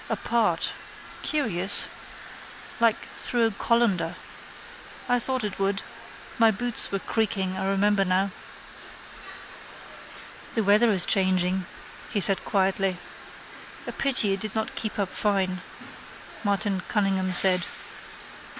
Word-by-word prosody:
Apart. 235 -2 0 0.5
Curious. 205 - +2 0.9
Like 230 -1 +1
through 240 -2 +3
a 225 - +1
colander. 230 -1 0 0.9
I 245 0 +2
thought 260 0 0
it 205 -2 -4
would. 195 0 0 0.6
My 225 -1 +6
boots 240 +2 0
were 195 - 0
creaking 195 -3 -1
I 190 0 -3
remember 195 +1 +2
now. 190 +1 0 2.2
—The 225 - +1
weather 210 +3 +4
is 190 -3 +3
changing, 185 -1 +1 0.4
he 210 - -1
said 195 0 +3
quietly. 195 -2 0 0.9
—A - - -5
pity 245 -7 +3
it 195 - -3
did 215 +1 -5
not 220 0 -2
keep 220 - -4
up 200 -3 -1
fine, 190 -3 -1 0.8
Martin 200 -2 0
Cunningham 195 -3 0
said. 180 -1 +4
200 Hz, 115 wpm, -25 LUFS, 190-225 Hz, 2.2 s, My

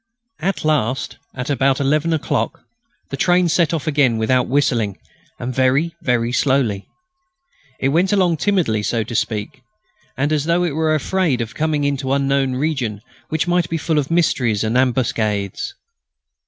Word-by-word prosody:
At 180 +1 -2
last, 135 -4 0 0.2
at 125 +3 -3
about 135 -1 +2
eleven 150 +4 +1
o'clock, 160 -2 -1 0.5
the - - -2
train 175 +4 +3
set 165 0 +2
off 160 -4 -2
again 140 -6 +2
without 125 +3 +1
whistling, 120 -7 +1 0.4
and 125 +1 -4
very 130 +6 +2 0.4
slowly. 125 -7 +1 0.9
It 135 - +1
went 175 +7 +2
along 185 -5 +2
timidly, 160 - +1
so 115 +1 -1
to 115 - -8
speak, 105 -2 -2 0.6
and 145 +3 +1
as 150 -1 0
though 170 +2 +2
it 170 -5 -1
was 155 -1 +1
afraid 170 -5 0
of 115 +1 -4
coming 155 -1 0
into 140 -1 -1
some - - +2
unknown 135 -1 +1
region 130 -8 -2 0.3
which 160 +2 -1
might 175 -1 +1
be 165 - -1
full 155 0 0
of 140 - -2
mysteries 125 -11 +1
and 110 +2 -1
ambuscades. 120 - 0
140 Hz, 155 wpm, -19 LUFS, 125-160 Hz, 0.9 s, train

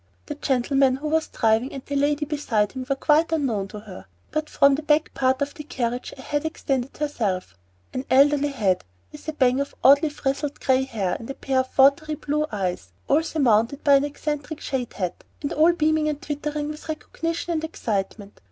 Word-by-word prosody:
The - - -4
gentleman 265 0 +2
who 290 +3 -5
was 320 0 +1
driving 225 +3 +1
and 270 - -8
the 285 - -4
lady 290 +1 +1
beside 250 -9 0
him 255 -1 -6
were 275 - +2
quite 310 +4 +3
unknown 245 -11 0
to 210 +2 -9
her; 190 - -11 0.2
but 310 0 -2
from 280 0 +5
the 285 - -1
back 305 0 +2
part 260 +1 +1
of 285 - -5
the 305 - -8
carriage 245 -3 -3
a 260 - -10
head 290 +1 -1
extended 275 -5 -2
itself, 210 - -2 0.4
an 255 +1 -3
elderly 285 +2 +5
head, 205 -10 0 0.3
with 300 - -12
a 315 - -2
bang 260 -3 +3
of 280 - -5
oddly 285 +3 +6
frizzled 285 0 -3
gray 265 0 +2
hair 205 -8 -2
and 230 - -9
a 275 - -4
pair 265 -1 0
of 260 0 -3
watery 285 +3 +4
blue 300 +1 -1
eyes, 180 - -3 0.2
all 315 - +4
surmounted 270 -5 +1
by 285 - +5
an 275 0 +5
eccentric 295 +1 -4
shade 255 -3 -3
hat, 180 -3 -4 0.2
and 285 - -2
all 320 +3 +5
beaming 310 -2 +1
and 295 -1 -3
twittering 295 0 -3
with 305 +1 -8
recognition 330 +2 -3
and 315 -1 -2
excitement. 205 -8 -4
280 Hz, 200 wpm, -24 LUFS, 250-300 Hz, 0.4 s, oddly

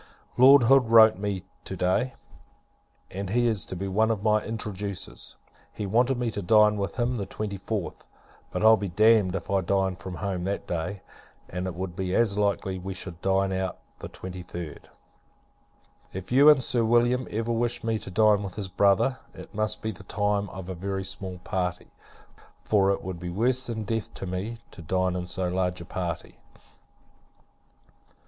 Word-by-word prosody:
Lord 135 +1 +8
Hood 125 0 +5
wrote 110 -1 +8
to - - -11
me, 100 -3 -2 0.2
to - - -6
day, 95 +8 +1 1.0
and 95 0 -5
he 120 +4 +2
is 110 -5 +1
to - - -6
be 95 +2 -4
one 110 +4 +2
of 105 -3 -1
my 110 -1 +3
introducers. 100 -4 -5 0.4
He 105 - -5
wanted 120 +6 +2
me 120 -2 -1
to 100 - -4
dine 105 +2 +5
with 100 -1 -3
him 120 +1 0
the 100 -3 -4
24th; 100 -1 -5 0.4
but - - -1
I'll 110 0 +8
be 100 -2 -3
damned 105 0 +4
if 95 - -5
I 100 -1 +3
dine 95 +1 0
from 95 0 -8
home 95 -3 -3
that 100 +1 -2
day, 90 +3 -4 0.4
and 90 +1 -4
it 90 - -5
would 90 -1 -5
be 95 -1 -2
as 110 -4 +3
likely 100 -2 0
we 95 +1 -6
should 90 -2 -7
dine 95 0 +1
out 95 0 -2 0.2
the - - -7
23d. 90 -3 -7 1.3
If 95 +2 -7
you 140 +4 +7
and 140 -4 +6
Sir 120 0 +1
William 120 +2 +2
ever 115 +2 -2
wish 120 +1 -1
me 115 -1 0
to - - -8
dine 105 +1 +4
with 100 -3 -6
his 100 -3 -4
brother, 100 +7 +2 0.2
it - - -11
must 110 -1 -2
be 110 - -1
the 95 - -12
time 105 -1 -1
of 95 -1 -8
a 95 - -4
very 95 +2 -3
small 95 -1 -5
party; 90 -1 -3 0.7
for 100 -2 +3
it 100 - 0
would 95 -2 -5
be 90 0 -5
worse 125 +8 +1
than 110 -2 -3
death 115 +1 -3
to - - -6
me, 95 +6 -4
to - - -11
dine 95 +2 0
in 90 -1 -4
so 90 0 -2
large 90 0 -1
a 85 - -8
party. 85 -2 -5
100 Hz, 185 wpm, -26 LUFS, 95-110 Hz, 1.3 s, Lord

